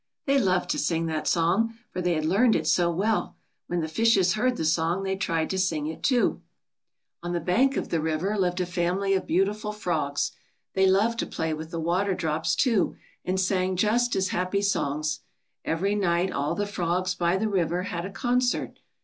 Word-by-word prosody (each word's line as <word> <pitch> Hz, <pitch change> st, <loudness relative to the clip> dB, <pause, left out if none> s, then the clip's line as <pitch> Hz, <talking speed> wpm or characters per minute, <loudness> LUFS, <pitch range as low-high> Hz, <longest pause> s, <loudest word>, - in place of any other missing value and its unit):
They 275 Hz, 0 st, +3 dB
loved 185 Hz, -6 st, +1 dB
to 300 Hz, -, -1 dB
sing 165 Hz, -10 st, 0 dB
that 155 Hz, -1 st, -2 dB
song, 195 Hz, +7 st, +1 dB
for 180 Hz, -, -3 dB
they 175 Hz, -1 st, +1 dB
had 155 Hz, 0 st, -1 dB
learned 215 Hz, +8 st, +4 dB
it -, -, 0 dB
so 175 Hz, -1 st, +3 dB
well. 205 Hz, +6 st, 0 dB, 0.3 s
When 175 Hz, -1 st, -1 dB
the 160 Hz, -, -2 dB
fishes 190 Hz, +1 st, +3 dB
heard 250 Hz, +3 st, +1 dB
the 160 Hz, -, -2 dB
song 165 Hz, +4 st, +1 dB
they 190 Hz, 0 st, -1 dB
tried 165 Hz, -4 st, -1 dB
to 190 Hz, -, -1 dB
sing 165 Hz, -5 st, 0 dB
it, 160 Hz, +1 st, -5 dB
too. 265 Hz, -, +2 dB
80 -, -, +3 dB
THE -, -, +5 dB
SONG -, -, -2 dB
THEY -, -, -17 dB
ALL -, -, -29 dB
SANG. -, -, -48 dB
On 175 Hz, 0 st, -4 dB
the 170 Hz, -2 st, -3 dB, 0.2 s
bank 270 Hz, -, -5 dB
of -, -, -3 dB
the 165 Hz, -, 0 dB
river 160 Hz, +6 st, -1 dB
lived 180 Hz, -2 st, 0 dB
a -, -, 0 dB
family 180 Hz, +2 st, 0 dB
of 190 Hz, -, -1 dB
beautiful 205 Hz, +4 st, 0 dB
frogs. 165 Hz, -9 st, -1 dB, 0.4 s
They 190 Hz, 0 st, +3 dB
loved 215 Hz, +5 st, +2 dB
to -, -, -1 dB
play 160 Hz, -1 st, -2 dB
with 155 Hz, +1 st, -6 dB
the 165 Hz, -, -4 dB
water 180 Hz, +4 st, 0 dB
drops, 160 Hz, -2 st, -1 dB
too^ 230 Hz, -8 st, +2 dB, 0.3 s
and 185 Hz, +1 st, -1 dB
sang 185 Hz, 0 st, +1 dB
just 225 Hz, +5 st, +2 dB
as 190 Hz, 0 st, +1 dB
happy 185 Hz, +3 st, -1 dB
songs. 150 Hz, -6 st, 0 dB, 0.4 s
Every 190 Hz, +5 st, 0 dB
night 185 Hz, -2 st, +1 dB
all 145 Hz, +4 st, -1 dB
the 205 Hz, -, -1 dB
frogs 185 Hz, -2 st, -1 dB
by 175 Hz, 0 st, +1 dB
the 220 Hz, +3 st, 0 dB
river 180 Hz, -3 st, 0 dB
had 175 Hz, -3 st, -4 dB
a 190 Hz, -, -5 dB
concert. 245 Hz, +3 st, 0 dB
185 Hz, 215 wpm, -26 LUFS, 165-200 Hz, 0.4 s, THE